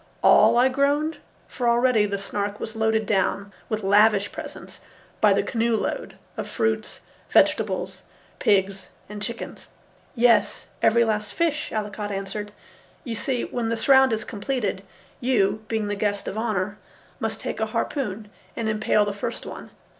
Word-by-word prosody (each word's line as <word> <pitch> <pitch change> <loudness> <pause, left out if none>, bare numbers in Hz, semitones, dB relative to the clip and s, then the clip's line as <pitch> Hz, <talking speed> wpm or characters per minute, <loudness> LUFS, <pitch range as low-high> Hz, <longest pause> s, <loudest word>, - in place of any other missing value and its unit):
"All?" - - +6
I 250 +2 +6
groaned, 285 +4 +1 0.3
for 245 -2 -1
already 235 -3 +3
the 200 0 -2
Snark 200 +1 -3
was 220 - -6
loaded 220 0 +1
down 200 0 0 0.2
with 215 -1 -2
lavish 205 +1 +4
presents, - - -9 0.4
by - - +6
the - - +3
canoe 230 -1 0
load, - - -3 0.2
of - - -4
fruits, 220 -1 -1 0.3
vegetables, - - +2 0.4
pigs, 195 -1 +1 0.2
and 210 0 -8
chickens. 230 +2 -6 0.5
"Yes, 235 -1 +3 0.2
every 235 +1 +4
last 215 -1 -2
fish," 310 -3 0
Allicot 210 -1 -3
answered. 205 +1 -4 0.5
"You 240 -6 -4
see, 245 +3 -1
when 235 -2 -3
the 230 - -1
surround 265 +2 +5
is 220 -1 -1
completed, 205 -3 -3 0.4
you, 215 -4 +1
being 220 -2 -1
the 205 - -1
guest 205 0 -1
of - - -4
honour, 210 -3 -2 0.4
must - - -2
take - - -4
a - - 0
harpoon 215 -7 -3 0.2
and 230 - -2
impale 215 -1 +2
the 205 - -2
first 200 - -5
one. - - -8
220 Hz, 155 wpm, -24 LUFS, 205-235 Hz, 0.5 s, All